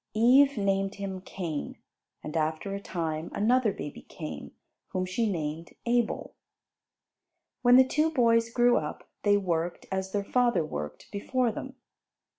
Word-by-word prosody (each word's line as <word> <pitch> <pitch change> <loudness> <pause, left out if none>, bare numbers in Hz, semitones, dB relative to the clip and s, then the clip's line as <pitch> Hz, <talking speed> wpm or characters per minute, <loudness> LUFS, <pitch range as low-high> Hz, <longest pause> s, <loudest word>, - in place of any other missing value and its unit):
Eve 260 +4 +5
named 195 -1 0
him 195 -2 -5
Cain; 170 -5 -5 0.5
and 150 - -6
after 160 +5 -1
a 200 - -3
time 165 -4 -3
another 230 +1 +3
baby 145 - -7
came, 75 -1 -8 0.4
whom 185 0 -2
she 205 +4 0
named 160 -1 -4
Abel. 240 -1 0 1.3
When 245 0 +6
the 260 0 +7
two 305 +4 +2
boys 230 -5 +3
grew 240 +1 +4
up, - - -4
they 205 -1 +4
worked, 175 -3 -2
as 190 0 -2
their 200 0 -1
father 240 -5 +2
worked 75 - -6
before 240 +4 0
them. 265 +4 -7
200 Hz, 140 wpm, -28 LUFS, 170-240 Hz, 1.3 s, the